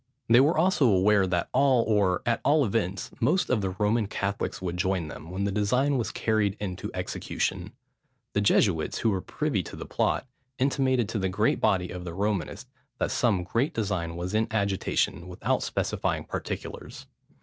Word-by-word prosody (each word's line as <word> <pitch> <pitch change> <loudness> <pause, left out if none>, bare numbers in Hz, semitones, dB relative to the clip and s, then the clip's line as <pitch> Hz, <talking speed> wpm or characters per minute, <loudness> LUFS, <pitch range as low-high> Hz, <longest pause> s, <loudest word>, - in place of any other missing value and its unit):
They 115 +2 +6
were 150 +5 +4
also 160 -5 +3
aware, 100 -1 +4
that 90 -1 -1
all, 130 -2 +4
or, 100 -5 +1
at 120 -1 +1
all 145 0 +4
events, 100 -3 -2
most 185 - +2
of 120 -5 +2
the 95 - -1
Roman 105 +3 0
Catholics 100 -1 -3
would 90 -2 -3
join 90 -2 -1
them, 80 - -9
when 95 +2 -3
the 100 - 0
design 125 +8 +1
was 120 -4 -1
carried 110 -2 0
into 95 -3 -4
execution. - - -3 0.6
The 100 - +1
Jesuits, 95 -5 +2
who 115 - +1
were 95 -2 -1
privy - - -1
to - - -9
the - - -7
plot, - - 0 0.3
intimated 130 -3 +1
to 110 - -2
the 95 -1 0
great 95 - +1
body 90 -2 +2
of 90 0 -6
the 85 -1 -6
Romanists, 100 -4 -2 0.3
that - - -1
some 105 -7 +1
great 125 - -1
design 95 -6 -2
was 90 +3 -4
in 110 +1 +2
agitation, 100 -3 0
without 90 -1 -1
specifying - - -1
particulars. - - -6
100 Hz, 175 wpm, -27 LUFS, 95-120 Hz, 0.6 s, They